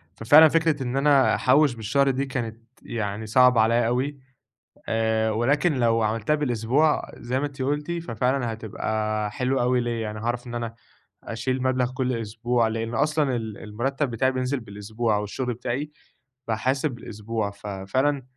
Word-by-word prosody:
ففعلًا 145 +10 +7
فكرة 160 -3 +1
إن 125 +1 -2
أنا 140 -1 +4
أحوِّش 140 +1 +4
بالشهر 125 +6 +1
دي 135 +1 0
كانت 120 -5 -4 0.3
يعني 105 -1 -4
صعبة 125 +1 +5
عليَّ 115 +1 +3
أوي، 135 +4 -1 0.7
آآ 110 0 +1
ولكن 140 +9 +2
لو 115 -3 +2
عملتها 110 +7 +1
بالأسبوع 140 +2 +1
زي 125 +2 -2
ما 145 - -1
أنتِ 140 -2 -7
قُلتِ 145 +4 -1
ففعلًا 125 -6 -1
هتبقى 110 -1 -2
حلوة 130 +4 0
أوي 125 +1 +2
ليَّ، 120 -1 -2
يعني 110 -1 -4
هاعرف 120 +2 -3
إن 120 - -6
أنا 115 -1 -4 0.5
أشيل 125 +3 -2
مبلغ 130 -1 +1
كل 130 0 -1
أسبوع، 115 +1 0
لأن 115 +1 -3
أصلًا 150 -3 +1
ال 110 -3 -5
المرتب 130 +6 -2
بتاعي 130 +3 +1
بينزِل 130 +1 -1
بالأسبوع، 110 +1 -2
أو 105 - -1
الشغل 125 +4 -3
بتاعي 125 +5 -3 0.6
باحاسب 130 +6 0
بالأسبوع، 110 -3 -4
ففعلًا 105 +8 -2
120 Hz, 155 wpm, -25 LUFS, 110-135 Hz, 0.7 s, ففعلًا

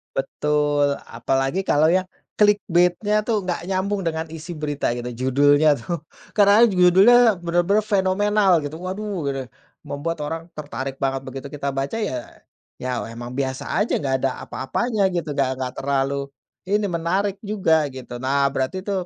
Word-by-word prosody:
Betul, 145 +1 +1 0.2
apalagi 135 +8 -1
kalau 155 -1 +4
yang 185 +2 +2 0.3
clickbait-nya, 205 0 +2
tuh, 220 -3 +1
nggak 175 -1 -3
nyambung 195 +1 -1
dengan 160 -1 -2
isi 160 +2 -7
berita, 145 -5 -2
gitu, 120 0 -5
judulnya, 145 +5 +3
tuh. 170 -3 -5 0.3
Kadang-kadang 210 +3 +6
judulnya 190 +7 +7 0.2
bener-bener 175 +5 +2
fenomenal, 205 0 +2
gitu, 145 +2 -6
waduh, 185 -1 -4
gitu 135 -1 -3
ya, - - -17 0.3
membuat 165 +4 -4
orang 160 +2 -3
tertarik 135 -2 -6
banget. 135 -1 0
Begitu 135 +1 -7
kita 140 -2 -4
baca, 135 +8 -2
ya 130 - -3 0.5
ya 125 -1 -2
emang 120 +2 -8
biasa 130 -1 -3
aja, 220 - 0
nggak 135 -2 -1
ada 135 - +1
apa-apanya, 205 - -1
gitu, 165 -4 -2
nggak 135 -2 +1
nggak 130 -1 -4
terlalu 140 0 -1 0.4
ini, 205 +1 +2
menarik 185 +3 -1
juga, 165 -8 +1
gitu. 125 -2 -8
Nah, 140 +2 +2
berarti, 155 +8 -2
tuh, 195 -3 -2
160 Hz, 150 wpm, -22 LUFS, 135-195 Hz, 0.5 s, judulnya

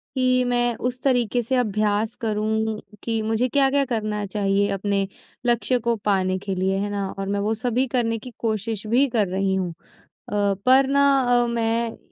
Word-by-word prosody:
कि 255 -1 +2
मैं 240 -1 +1
उस 250 0 -9
तरीके 245 -3 +2
से 255 +3 -1
अभ्यास 215 -1 0
करूँ 220 0 -1 0.2
कि 225 -1 -1
मुझे 225 +3 0
क्या-क्या 275 +1 +2
करना 215 -4 -2
चाहिए 200 0 +1
अपने 195 0 0 0.4
लक्ष्य 240 +1 +2
को 235 0 0
पाने 185 -2 +1
के 195 0 -4
लिए, 190 +1 0
है 205 +1 -2
ना? 200 -1 -2
और 195 - -3
मैं 200 +1 -1
वो 210 +2 0
सभी 245 +3 0
करने 230 -3 0
की 250 - -10
कोशिश 220 -1 -2
भी 250 +6 +3
कर 220 -4 +1
रही 190 +1 0
हूँ। 185 -2 -1 0.6
अ, - - -6 0.3
पर 265 +1 +6
ना 280 +1 +3 0.2
अ, 245 -1 +3
मैं 230 0 -1
225 Hz, 180 wpm, -23 LUFS, 205-245 Hz, 0.6 s, पर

